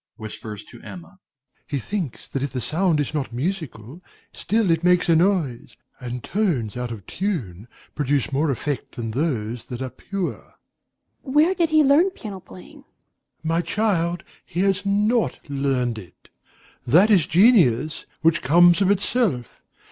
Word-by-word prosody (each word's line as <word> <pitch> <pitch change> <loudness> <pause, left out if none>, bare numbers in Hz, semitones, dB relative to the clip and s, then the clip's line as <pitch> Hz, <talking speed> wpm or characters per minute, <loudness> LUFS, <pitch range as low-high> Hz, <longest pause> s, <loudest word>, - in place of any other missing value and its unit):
DOMINIE - - -12
(whispers 105 -2 -8
to - - -14
Emma). 185 +2 -11 0.5
He 145 - -2
thinks 160 - -4
that 135 - -4
if 140 -1 -2
the 130 - -2
sound 160 +4 +1
is 145 0 -2
not 145 -4 -2
musical, 145 - -5 0.3
still 215 -3 0
it 165 0 +1
makes 180 0 +3
a 165 - +5
noise; 165 -8 0 0.2
and 125 -1 -6
tones 160 - -1
out 125 0 -3
of 110 -5 -8
tune 120 - -4 0.3
produce 145 -2 0
more 145 +3 +1
effect 140 +1 -3
than 115 -2 -4
those 120 -4 -2
that 125 - -7
are 130 -1 -4
pure. 195 -3 -4
EMMA. - - -27 0.8
Where 320 +5 +5
did 340 -4 +1
he 310 -1 +5
learn 295 +7 +5
piano 215 - -8
playing? 95 - -14
DOMINIE. - - -20 0.6
My 165 +1 +1
child, 175 -2 0 0.2
he 175 - -3
has 195 0 +1
not 210 +4 +1
learned 135 -5 -1
it. 90 -4 -16 0.6
That 180 - +5
is 180 -6 +4
genius, 165 - +3
which 165 +1 +3
comes 175 +5 +5
of 195 - +3
itself. 200 - 0
160 Hz, 160 wpm, -23 LUFS, 125-195 Hz, 0.8 s, a